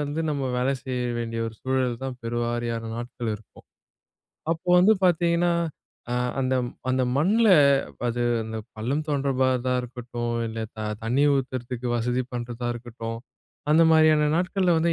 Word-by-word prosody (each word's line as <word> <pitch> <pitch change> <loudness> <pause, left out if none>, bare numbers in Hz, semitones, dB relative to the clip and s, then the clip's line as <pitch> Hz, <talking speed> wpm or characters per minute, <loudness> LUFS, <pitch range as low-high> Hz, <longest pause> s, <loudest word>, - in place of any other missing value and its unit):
வந்து 145 +2 -2
நம்ம 140 -3 -1
வேல 125 +2 +1
செய்ய 125 -2 -2
வேண்டிய 115 -1 -3
ஒரு 115 - -6
சூழல் 130 -2 0
தான் 130 -2 -4
பெருவாரியான 120 -1 -2
நாட்கள் 120 -1 -4
இருக்கும். 105 0 -14 0.9
அப்போ 170 +2 -7
வந்து 190 +5 +6
பார்த்தீங்கன்னா, 170 0 +3 0.6
அ - - 0 0.3
அந்த 130 0 +1 0.4
அந்த 130 0 +2
மண்ல 210 +10 +3 0.6
அது 120 +1 -2 0.2
அந்த 110 0 -5 0.2
பள்ளம் 135 +8 -1
தோன்றபா 135 -2 +1 0.2
தான் 125 0 +2
இருக்கட்டும், 120 -1 -4
இல்ல 115 0 -5 0.2
த - - -12 0.3
தண்ணி 125 +6 +2
ஊத்துறதுக்கு 125 -2 -3
வசதி 125 +2 0
பண்றதா 120 0 -4
இருக்கட்டும், 115 -1 -6 0.5
அந்த 160 +2 +6
மாரியான 155 -1 +5
நாட்கள்ல 180 -1 +2
வந்து 170 +1 +2
125 Hz, 140 wpm, -25 LUFS, 120-150 Hz, 0.9 s, வந்து